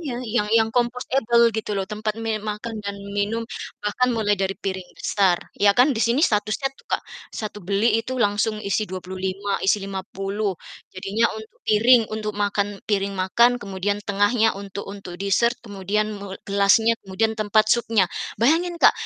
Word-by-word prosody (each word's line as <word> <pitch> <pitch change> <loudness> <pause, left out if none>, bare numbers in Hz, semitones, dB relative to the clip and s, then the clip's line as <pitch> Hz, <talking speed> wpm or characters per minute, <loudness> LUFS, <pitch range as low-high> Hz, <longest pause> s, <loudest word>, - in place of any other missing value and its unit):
iya 295 -6 -4 0.2
yang 210 - +2
yang 225 0 +4
compostable 240 -1 +2
gitu 220 - -3
loh, 195 - -1
tempat 215 0 -2
me 225 - -1 0.2
makan 220 +2 -6
dan 200 0 -4 0.2
minum, 210 +3 0 0.4
bahkan 250 +5 +1
mulai 210 -2 +1
dari 195 0 0
piring 190 -2 -3
besar, 190 -4 +2 0.2
iya 200 0 +6
kan, 250 - +7
di - - -1
sini 240 +5 +2
statusnya 215 +5 0
tuh, - - -21
Kak, - - +1 0.4
1 210 -1 -5
beli 200 +3 +1
itu 240 +3 -6
langsung 205 +1 0
isi 200 - +1
25, 190 +2 -4
isi 195 - +4
50. 195 +1 -3 0.4
Jadinya 195 +4 -1
untuk 220 0 -11
piring, 230 +3 +6
untuk 215 -1 -3
makan 205 0 0 0.2
piring 200 -1 0
makan, 190 +6 +4
kemudian 200 0 -2
tengahnya 205 +3 +3
untuk 200 0 -7
untuk 195 -3 -9
dessert, 200 +5 +2
kemudian 205 0 -1
me 200 -1 -7
gelasnya, 200 +3 +4
kemudian 215 +4 0
tempat 215 +1 +3
supnya. 230 -4 +2 0.4
Bayangin 335 +8 +2
Kak, - - +7
205 Hz, 160 wpm, -23 LUFS, 195-225 Hz, 0.4 s, kan